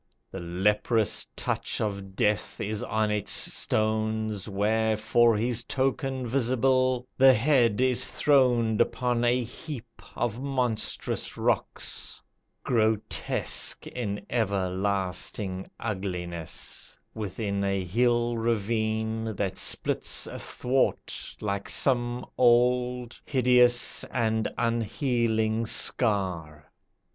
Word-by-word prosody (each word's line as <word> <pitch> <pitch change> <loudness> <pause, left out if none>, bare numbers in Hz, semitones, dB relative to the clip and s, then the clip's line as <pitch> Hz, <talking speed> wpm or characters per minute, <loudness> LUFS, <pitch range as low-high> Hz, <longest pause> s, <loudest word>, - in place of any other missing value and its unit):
The 95 - -6
leprous 105 +5 0
touch - - -2
of 100 -2 -4
Death 105 -1 0
is 105 0 -3
on 110 0 0
its 105 -1 -2
stones, 110 -1 0
Where 110 +2 +1
for 115 +1 +3
his 120 +1 0
token 130 0 -1
visible, 130 0 +1
the 135 -1 +8
Head 120 -3 +3
Is 130 -1 +2
throned 120 -6 +3
upon 120 0 0
a 120 +1 +2
heap 120 -1 -9
of 120 0 -2
monstrous 125 -5 -2
rocks, - - -1 0.4
Grotesque 110 -3 0
in 105 -5 -4
everlasting 95 -2 -2
ugliness, 90 -6 -4 0.2
Within 100 -1 -3
a 100 -1 0
hill 120 +4 +1
ravine, 110 0 -1
that 95 -1 -2
splits - - -1
athwart 130 +2 -2
Like 100 -1 -3
some 120 -2 +2
old, 125 0 +2
hideous 125 -2 +4
and 110 -2 0
unhealing 115 -1 0
scar. 90 - 0
110 Hz, 95 wpm, -27 LUFS, 105-125 Hz, 0.4 s, the